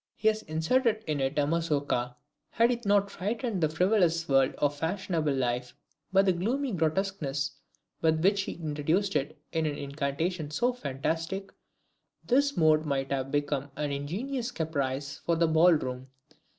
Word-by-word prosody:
He 220 Hz, -, +3 dB
has 215 Hz, 0 st, -1 dB
inserted 220 Hz, +8 st, +1 dB
in 150 Hz, -2 st, -1 dB
it 135 Hz, +2 st, -1 dB
a 145 Hz, -, +3 dB
MAZOURKA. 145 Hz, -6 st, 0 dB, 0.3 s
Had 230 Hz, +6 st, +3 dB
he 240 Hz, -1 st, -2 dB
not 200 Hz, 0 st, +3 dB
frightened 215 Hz, 0 st, -2 dB
the 155 Hz, -, +3 dB
frivolous 170 Hz, -1 st, +2 dB
world 135 Hz, -1 st, +3 dB
of 145 Hz, 0 st, +1 dB
fashionable 165 Hz, -2 st, -1 dB
life, 125 Hz, -1 st, -1 dB, 0.4 s
by 195 Hz, +1 st, +5 dB
the 190 Hz, -2 st, +3 dB
gloomy 245 Hz, +10 st, -1 dB
grotesqueness 155 Hz, -5 st, -1 dB, 0.5 s
with 160 Hz, 0 st, +2 dB
which 200 Hz, +1 st, +4 dB
he -, -, -4 dB
introduced 160 Hz, +5 st, -1 dB
it 150 Hz, +3 st, -1 dB
in 160 Hz, -1 st, 0 dB
an 145 Hz, -, -3 dB
incantation 145 Hz, +3 st, -2 dB
so 245 Hz, +11 st, +1 dB
fantastic, 165 Hz, -, -3 dB, 0.7 s
this 280 Hz, +3 st, +2 dB
mode 155 Hz, -1 st, +4 dB
might 135 Hz, -3 st, -2 dB
have 135 Hz, -1 st, -1 dB
become 145 Hz, -1 st, -1 dB
an 150 Hz, -1 st, -2 dB
ingenious 225 Hz, -, -3 dB
caprice 140 Hz, -, -2 dB
for 170 Hz, -, 0 dB
the 165 Hz, 0 st, +3 dB
ball 160 Hz, +3 st, +6 dB
room. 130 Hz, -4 st, -3 dB
160 Hz, 155 wpm, -29 LUFS, 145-195 Hz, 0.7 s, ball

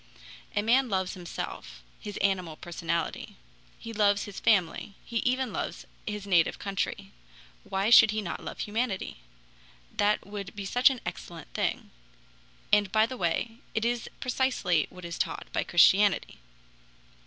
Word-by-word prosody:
"A 205 Hz, -, +2 dB
man 250 Hz, +3 st, +3 dB
loves 190 Hz, -2 st, 0 dB
himself 175 Hz, -2 st, -7 dB, 0.2 s
(his 205 Hz, -2 st, -7 dB
animal 185 Hz, -5 st, 0 dB
personality), 170 Hz, -1 st, -3 dB, 0.4 s
he 230 Hz, -, -8 dB
loves 205 Hz, -1 st, +3 dB
his 205 Hz, -2 st, -7 dB
family, 195 Hz, -1 st, +1 dB
he 235 Hz, -, -3 dB
even 255 Hz, +2 st, 0 dB
loves -, -, -4 dB, 0.2 s
his 210 Hz, -1 st, -4 dB
native 175 Hz, -5 st, +3 dB
country. 195 Hz, -1 st, -3 dB, 0.5 s
Why 195 Hz, +3 st, 0 dB
should 225 Hz, -, +9 dB
he 215 Hz, +1 st, 0 dB
not 195 Hz, -5 st, -5 dB
love -, -, -6 dB
humanity? 215 Hz, -2 st, -2 dB, 0.8 s
That 205 Hz, +1 st, +2 dB
would 200 Hz, -1 st, -7 dB
be 200 Hz, -1 st, -5 dB
such 245 Hz, +7 st, +5 dB
an 260 Hz, -3 st, -4 dB
excellent 165 Hz, -3 st, -7 dB
thing. -, -, -2 dB, 0.8 s
And 205 Hz, -2 st, +4 dB
by 215 Hz, +1 st, +4 dB
the 255 Hz, +3 st, -6 dB
way, 225 Hz, +4 st, -1 dB, 0.2 s
it 220 Hz, +1 st, +1 dB
is 240 Hz, -1 st, -1 dB
precisely 250 Hz, -, +1 dB
what 180 Hz, -1 st, -11 dB
is 170 Hz, -1 st, -6 dB
taught -, -, -2 dB
by -, -, +1 dB
Christianity." 190 Hz, +3 st, +4 dB
205 Hz, 145 wpm, -28 LUFS, 185-225 Hz, 0.8 s, should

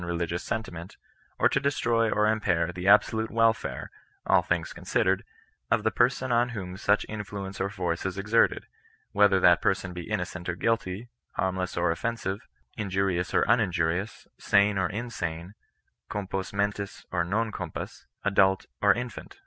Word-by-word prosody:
religious 85 Hz, 0 st, -2 dB
seTitiment, 90 Hz, -5 st, -5 dB, 0.4 s
or -, -, +5 dB
to -, -, +1 dB
destroy 120 Hz, -5 st, +1 dB
or 105 Hz, 0 st, +2 dB
impair 90 Hz, -6 st, +1 dB
the 90 Hz, +1 st, -4 dB
absolute 110 Hz, +2 st, +4 dB
nvelfare, 115 Hz, 0 st, +1 dB, 0.4 s
all -, -, +5 dB
things 85 Hz, -2 st, -2 dB
considered, -, -, 0 dB, 0.5 s
of -, -, +2 dB
the -, -, +2 dB
person 130 Hz, -1 st, +1 dB
on 120 Hz, +1 st, +3 dB
whom 95 Hz, -6 st, -6 dB
such 105 Hz, +2 st, +2 dB
influence 100 Hz, -2 st, -6 dB
or 100 Hz, -, 0 dB
force 90 Hz, -4 st, -2 dB
is 95 Hz, 0 st, -3 dB
exerted; 105 Hz, +4 st, +2 dB, 0.5 s
whether 100 Hz, -2 st, +4 dB
that 90 Hz, -2 st, +5 dB
person 95 Hz, -1 st, 0 dB
be 90 Hz, +1 st, -7 dB
innocent 90 Hz, -4 st, -3 dB
or 85 Hz, -, -1 dB
guilty, 110 Hz, +1 st, -1 dB, 0.3 s
harmless 95 Hz, -1 st, -2 dB
or 85 Hz, -1 st, +2 dB
offensive, 100 Hz, +1 st, -3 dB, 0.3 s
injurious 95 Hz, -3 st, 0 dB
or -, -, +3 dB
uninjurious, 95 Hz, -3 st, +1 dB
sane 100 Hz, +1 st, +3 dB
or 90 Hz, -, +1 dB
insane, 95 Hz, -6 st, -4 dB, 0.6 s
compos 95 Hz, -2 st, -3 dB
mentis 100 Hz, 0 st, -2 dB
or -, -, +1 dB
non 110 Hz, +6 st, -1 dB
compos^ -, -, -6 dB, 0.2 s
:adult 95 Hz, -1 st, +3 dB, 0.2 s
or 100 Hz, -, +6 dB
infant. 125 Hz, -, -7 dB
100 Hz, 150 wpm, -27 LUFS, 90-110 Hz, 0.6 s, or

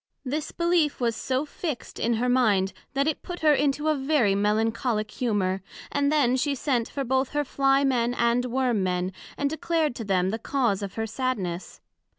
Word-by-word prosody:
This 300 Hz, +4 st, -3 dB
belief 340 Hz, -3 st, +1 dB
was 235 Hz, -2 st, 0 dB
so 260 Hz, +4 st, -1 dB
fixt 300 Hz, -2 st, -5 dB
in 235 Hz, -, +1 dB
her 240 Hz, +3 st, 0 dB
mind, 215 Hz, -7 st, +3 dB, 0.2 s
that 275 Hz, +2 st, +2 dB
it 315 Hz, -, -1 dB
put 355 Hz, 0 st, -7 dB
her 305 Hz, -1 st, +5 dB
into 290 Hz, +2 st, +1 dB
a 310 Hz, -, +4 dB
very 270 Hz, -7 st, +2 dB
Melancholick 215 Hz, +2 st, 0 dB
humor; 195 Hz, -6 st, 0 dB, 0.3 s
and 285 Hz, 0 st, +1 dB
then 270 Hz, -5 st, +3 dB
she 280 Hz, +2 st, 0 dB
sent 250 Hz, -4 st, -1 dB, 0.2 s
both 265 Hz, +1 st, +2 dB
for 295 Hz, -, -6 dB
her 295 Hz, -, +2 dB
Fly 275 Hz, 0 st, +2 dB
men 245 Hz, -3 st, +1 dB
and 235 Hz, +1 st, +2 dB
Worm 250 Hz, -3 st, +1 dB
men, 180 Hz, 0 st, -1 dB, 0.2 s
and 285 Hz, -, +1 dB
declared 315 Hz, 0 st, 0 dB
to 230 Hz, -, -4 dB
them 190 Hz, -2 st, +1 dB
the 225 Hz, -, -3 dB
cause 235 Hz, -6 st, 0 dB
of 200 Hz, -2 st, -5 dB
her 225 Hz, -, -1 dB
sadness. 215 Hz, -7 st, -3 dB
250 Hz, 185 wpm, -26 LUFS, 215-285 Hz, 0.3 s, her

